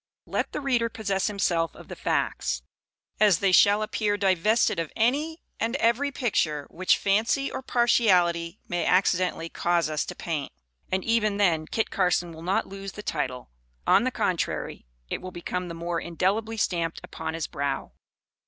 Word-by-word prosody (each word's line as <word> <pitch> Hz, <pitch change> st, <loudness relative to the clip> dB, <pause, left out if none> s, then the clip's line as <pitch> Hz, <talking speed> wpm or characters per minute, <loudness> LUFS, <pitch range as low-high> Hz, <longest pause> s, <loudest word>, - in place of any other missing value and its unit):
Let -, -, -2 dB
the -, -, -4 dB
reader 245 Hz, -4 st, +1 dB
possess 200 Hz, -4 st, -1 dB
himself 175 Hz, -5 st, 0 dB
of -, -, -13 dB
the -, -, -7 dB
facts, -, -, -1 dB, 0.6 s
as 205 Hz, -5 st, +5 dB
they 195 Hz, +2 st, +2 dB
shall 205 Hz, +3 st, +6 dB
appear 210 Hz, -1 st, 0 dB
divested 200 Hz, +2 st, +2 dB
of 165 Hz, -2 st, -3 dB
any 290 Hz, +8 st, 0 dB, 0.2 s
and 230 Hz, +3 st, 0 dB
every 275 Hz, +2 st, +2 dB
picture 155 Hz, -, 0 dB
which 185 Hz, +2 st, +2 dB
fancy 225 Hz, +7 st, +1 dB
or 265 Hz, -, -4 dB
partiality 185 Hz, -9 st, +2 dB
may 175 Hz, -1 st, -1 dB
accidentally 180 Hz, -2 st, +2 dB
cause 170 Hz, -2 st, 0 dB
us 155 Hz, -, 0 dB
to 180 Hz, -, -7 dB
paint, 155 Hz, -6 st, -3 dB, 0.4 s
and 190 Hz, 0 st, 0 dB
even 215 Hz, -3 st, +1 dB
then 165 Hz, -6 st, +2 dB
Kit 225 Hz, -, -1 dB
Carson 180 Hz, -2 st, +1 dB
will 160 Hz, -, -10 dB
not 185 Hz, +4 st, 0 dB
lose 195 Hz, 0 st, -8 dB
the 210 Hz, -, -8 dB
title. 125 Hz, -, -3 dB, 0.3 s
On -, -, +5 dB
the -, -, +2 dB
contrary, -, -, -2 dB, 0.2 s
it -, -, -2 dB
will 185 Hz, -, -6 dB
become 180 Hz, +1 st, -4 dB
the 170 Hz, -, -6 dB
more 170 Hz, 0 st, -2 dB
indelibly 200 Hz, +6 st, -1 dB
stamped 170 Hz, -5 st, -1 dB
upon 160 Hz, -, -5 dB
his 165 Hz, -, -2 dB
brow. 140 Hz, -1 st, -3 dB
190 Hz, 165 wpm, -26 LUFS, 170-220 Hz, 0.6 s, shall